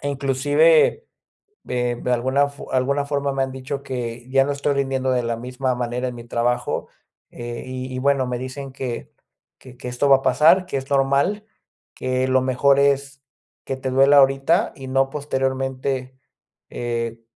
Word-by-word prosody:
Inclusive, 145 - +2 0.6
eh, 125 -1 -1
de 125 - -1
alguna 130 +4 +2
fo 140 - -11
alguna 140 +2 +1
forma 140 -1 -1
me 135 0 0
han 130 - -4
dicho 130 +1 -5
que 120 -3 -5
ya 135 0 +4
no 145 - -2
estoy 140 0 0
rindiendo 135 -1 0
de 125 -1 +1
la 115 0 -1
misma 125 +2 -2
manera 125 +1 -2
en 125 - -8
mi 120 -1 -10
trabajo, 120 +1 -1 0.4
eh, 120 0 -7
y 130 0 -6
y - - -3
bueno, 140 0 +2
me 125 0 -2
dicen 135 +2 -6
que 130 -3 -5 0.5
que 125 -1 -15
que 125 - -8
esto 125 +3 0
va 135 - +8
a - - -9
pasar, 155 +8 +4
que 180 - -6
es 135 +1 -6
normal, 140 +9 +1 0.5
que 130 0 -1
lo 130 0 +3
mejor 135 +2 +3
es 140 -1 +1 0.4
que 135 - -3
te 130 0 -3
duela 135 +2 +5
ahorita 135 +9 +3
y 135 -1 -9
no 135 +1 +1
posteriormente. 130 -2 -2 0.6
Eh, 115 -1 -3
135 Hz, 175 wpm, -22 LUFS, 125-140 Hz, 0.6 s, va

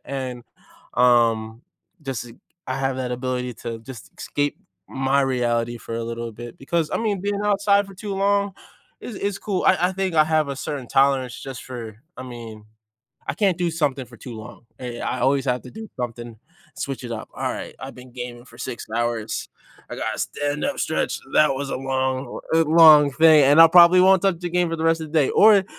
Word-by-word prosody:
and, 130 -3 -5 0.5
um, 115 -2 +2 0.4
just 125 -4 -5 0.3
I 130 - -2
have 135 -1 -1
that 125 -1 -3
ability 125 -1 -3
to 115 -1 -5
just 115 -5 -11
escape 145 0 -3 0.3
my 135 +1 +1
reality 120 -2 -1
for 115 - -7
a 115 0 -3
little 115 0 -5
bit 120 +2 -10
because, 160 +3 -1
I - - 0
mean, 210 -4 -1
being 205 0 -1
outside 200 0 +2
for 195 - -13
too 205 +2 -6
long 200 0 +1 0.5
is 235 - -8
is 200 0 -3
cool. 195 -3 -2
I - - +6
I - - -4
think 190 -2 -2
I 155 - +5
have 155 -1 +1
a 140 - -4
certain 140 -2 -5
tolerance 135 -2 +2
just 135 -2 -8
for 115 -4 -8 0.2
I 130 - -7
mean 115 -4 -9 0.6
I - - +1
can't 195 -5 +1
do 175 -1 0
something 145 -5 -1
for 120 - -15
too 120 -3 -9
long, 110 +2 -11
eh, 120 -2 -6
I 125 - -3
always 135 +2 +2
have 125 0 0
to - - -11
do 220 +1 -9
something, 120 -2 -6 0.4
switch 135 -2 -5
it 120 - -5
up. 110 -1 -6
"Alright, - - -4
I've - - -8
been 125 0 -14
gaming 120 -1 -7
for - - -17
6, 125 -3 -6
hours, 120 -2 -2 0.4
I - - -6
gotta - - -3
stand 145 0 -2
up 280 - -2
stretch. 160 - -1
That 150 -3 +4
was 140 0 -4
a - - -2
long 130 0 -2
a - - +4
long 155 -2 +7
thing." 155 0 +6
and 145 +4 +6
I 165 - +8
probably 175 +1 +7
won't 190 0 +5
touch 190 -4 +1
the 175 -1 -4
game 175 -1 +1
for 165 - -2
the 160 - -3
rest 165 0 +2
of 155 - -7
the 160 - +3
day, 140 - +1
or, 205 -3 +6
135 Hz, 205 wpm, -22 LUFS, 120-165 Hz, 0.6 s, I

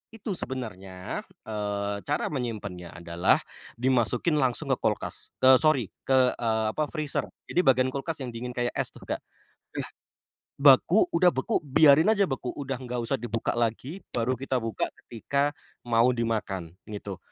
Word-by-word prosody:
itu 215 -1 -5
sebenarnya, 95 -8 -4 0.2
eee, 105 -1 -3
cara 145 +1 -1
menyimpannya 105 -9 -5
adalah, 85 0 +1 0.3
dimasukin 125 +5 +2
langsung 125 -4 +3
ke - - +2
kulkas. - - -2
Te 130 0 +7
sori, 135 - +5 0.2
ke, 135 - +3 0.2
eee, 110 -2 0
apa 155 - -1
freezer. 155 -2 -1 0.2
Jadi - - 0
bagian 130 -1 +4
kulkas 140 +3 -4
yang 130 - -4
dingin 125 +2 -6
kayak 120 0 -1
es - - +1
tuh, - - -15
Kak. - - -3
Eh, - - -41 1.3
beku 145 +8 +5
udah 175 +1 +4
beku 130 - 0
biarin 145 +3 +5
aja 200 -5 +2
beku, 130 -2 -3
udah 135 -2 -4
nggak 125 -1 -5
usah 115 - +4
dibuka 115 -1 -3
lagi 120 - -2 0.2
baru 120 +1 -1
kita 130 -2 -2
buka 115 -3 -2 0.2
ketika 140 +6 -1 0.4
mau 120 +1 +3
dimakan, 105 -7 -3 0.2
gitu. 100 -3 -7
125 Hz, 150 wpm, -26 LUFS, 110-140 Hz, 1.3 s, Te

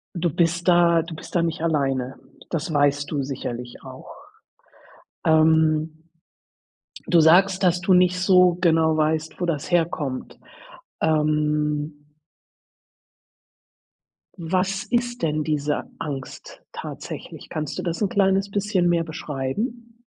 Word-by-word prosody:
du 170 0 0
bist 170 +2 0
da 170 -1 +5
du 165 0 -8
bist - - -11
da 170 - +3
nicht 165 0 -2
alleine, 135 -5 -1 0.3
das 165 0 -3
weißt 145 -1 +1
du 140 -3 -1
sicherlich 125 -2 -6
auch. - - -11 1.1
Ähm, 160 0 +2 1.0
du 170 -2 +4
sagst, 185 +4 +4
dass 180 -1 +2
du 190 - +2
nicht 180 0 +4
so 180 -2 +4
genau 160 -2 +3
weißt, 155 +2 -1
wo 175 - 0
das 155 -1 -3
herkommt. 160 -6 -1 0.6
Ähm 150 -1 0 2.4
was 185 +3 -1
ist 240 0 -1
denn 155 -1 0
diese 150 -1 -1 0.2
Angst 140 -3 -7
tatsächlich? - - -8
Kannst 155 -3 -4
du - - -4
das 170 +3 -3
'n 200 - +1
kleines 195 0 +2
bisschen 195 -3 0
mehr 170 -1 +2
beschreiben? 215 - -5
160 Hz, 120 wpm, -23 LUFS, 150-180 Hz, 2.4 s, da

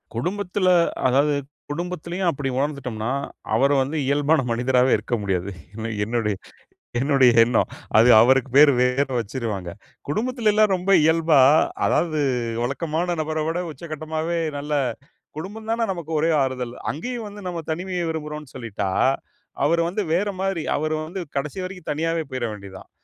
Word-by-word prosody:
குடும்பத்தில 185 - -1 0.4
அதாவது 140 +3 +3 0.3
குடும்பத்திலேயும், 175 +3 -3
அப்பிடி 140 -3 -2
உணர்ந்துட்டம்னா, 130 -5 -2 0.4
அவரு 135 +6 +3
வந்து 145 +4 -4
இயல்பான 145 +2 +3
மனிதராவே 125 +2 +2
இருக்க 110 +3 -2
முடியாது. 95 -1 -2 0.2
என்ன, 115 0 -4 1.1
என்னுடைய 135 -3 +5
எண்ணம். 115 0 +1 0.3
அது 115 +3 +6
அவருக்கு 130 +2 +4
பேரு 145 0 +8
வேற 125 +3 +2
வச்சிருவாங்க. 110 -6 -4 0.4
குடும்பத்தில 230 - +1
எல்லாம் 215 -1 +4
ரொம்ப 185 +2 -1
இயல்பா, 160 -1 +4 0.5
அதாவது 160 -3 +1 0.4
வழக்கமான 165 +6 -1
நபர 155 0 -2
விட, 165 +2 -1
உச்சகட்டமாவே 160 +1 -4 0.2
நல்ல 145 +1 -4 0.6
குடும்பம் 210 +7 -7
தான 230 +1 0
நமக்கு 170 -4 -6
ஒரே 160 +2 +2
ஆறுதல். 125 -2 -3 0.2
அங்கேயும் 235 - -5
வந்து 205 0 -10
நம்ம 175 -2 -3
தனிமைய 180 +2 -2
விரும்புறோன்னு 150 -3 -6
சொல்லிட்டா, 110 -6 -3 0.8
அவரு 170 +3 +3
வந்து 195 +4 -2
வேறமாரி. 190 -2 -1
அவரு 155 +2 -1
வந்து 180 +4 -5 0.2
கடைசி 145 +6 -3
வரைக்கும் 185 -2 -7
தனியாவே 165 +2 -1
போயிற 130 -2 -2
வேண்டியதான். 100 -2 -11
150 Hz, 130 wpm, -23 LUFS, 130-175 Hz, 1.1 s, பேரு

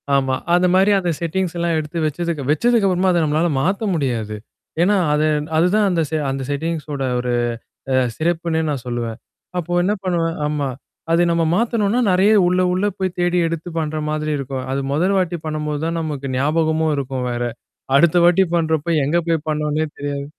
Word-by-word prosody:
ஆமா. 135 -1 +1 0.2
அந்த 180 +1 +4
மாரி, 195 +2 +4
அந்த 180 -2 -2
செட்டிங்ஸ் 175 +1 -2
எல்லாம் 170 -1 0
எடுத்து 155 +2 -6
வச்சதுக்கு, 155 0 -2
வச்சதுக்கப்புறமாதா 190 -2 +2
நம்மளால 155 +3 +1
மாத்த 195 +7 0
முடியாது. 120 -8 -2 0.5
ஏன்னா 200 +4 +4 0.2
அது 150 +1 +2 0.3
அதுதான் 185 +6 +3
அந்த 175 -3 +1
செ 160 - -2
அந்த 135 0 -3
செட்டிங்ஸோட 150 -1 -3 0.2
ஒரு 125 0 -1 0.6
அ - - +2 0.2
சிறப்புன்னே 165 0 0
நான் 140 -5 -3
சொல்லுவேன். 120 -2 -3 0.4
அப்போ 175 0 -3
என்ன 200 +3 +2
பண்ணுவேன் 170 -3 -1
ஆமா. 150 -2 -1 0.4
அத 170 +1 +4
நம்ம 170 0 +2
மாத்தணும்னா 225 0 +1
நெறைய 190 +4 +4
உள்ள, 180 +1 +2
உள்ள 185 +3 0
போய் 185 -2 -2
தேடி 175 0 +1
எடுத்து 165 +1 -4
பண்ற 155 -1 -2
மாதிரி 155 0 -2
இருக்கும். 135 -1 -4
அது 135 +1 -1
மொதல் 180 +7 +2
வாட்டி 175 -2 -1
பண்ணும்போது 150 -1 -3
தான் 165 0 -1
நமக்கு 145 -4 -4
ஞாபகமும் 160 +2 +1
இருக்கும் 130 -2 -3
வேற. 120 0 -2 0.5
அடுத்த 170 +3 +4
வாட்டி 180 +2 +5
பண்றப்ப 160 -2 0 0.2
எங்க 155 +5 +1
போய் 160 -2 0
பண்ணோனே 150 0 0
தெரியாது. 145 -1 -4
160 Hz, 165 wpm, -20 LUFS, 145-175 Hz, 0.6 s, வாட்டி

